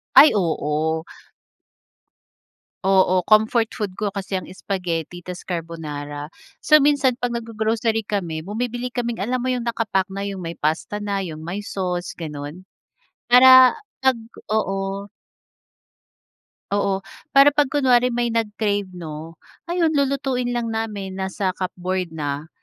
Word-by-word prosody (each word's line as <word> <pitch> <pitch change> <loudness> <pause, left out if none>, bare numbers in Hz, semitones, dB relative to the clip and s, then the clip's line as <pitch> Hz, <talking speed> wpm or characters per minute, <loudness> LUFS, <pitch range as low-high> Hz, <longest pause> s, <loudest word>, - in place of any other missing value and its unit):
Ay 305 - +10
oo. 160 -3 0 1.8
Oo, 185 -1 +4
comfort 220 +1 +4
food 205 -5 -4
ko 205 0 -2
kasi 195 0 -4
ang 185 - -4
spaghetti 175 -3 -4
ta's 180 0 -8
carbonara. 150 -4 -5 0.3
So, 305 0 +5
minsan 280 -3 +3
pag 245 0 -2
naggo-grocery 225 -1 -1
kami 175 -7 -3
bumibili 245 +5 -3
kaming 235 -3 -3
alam 250 +4 -1
mo 250 - -3
yung 245 -1 -2
naka-pack 220 -5 -1
na 195 +1 -4
yung 195 -2 -5
may 165 0 -6
pasta 160 +7 -1
na 200 -1 -2
yung 160 -4 -6
may 190 +5 -4
sauce 180 -3 -3
ganun, 150 +2 -7 0.6
para 255 +1 +8 0.3
pag 265 -2 +3 0.3
oo. 195 -1 -1 1.7
Oo, 195 -1 0 0.2
para 275 +1 +6
pag 290 -2 +2
kunwari 250 -3 +3
may 240 -1 -1
nag-crave, 210 -3 -1
'no, 165 -2 -8 0.3
ayun 340 -2 +2
lulutuin 270 -3 0
lang 240 -2 -2
namin 210 -4 -3
nasa 190 0 -2
cupboard 185 -1 -3
na 150 -1 -4
200 Hz, 125 wpm, -22 LUFS, 175-240 Hz, 1.8 s, Ay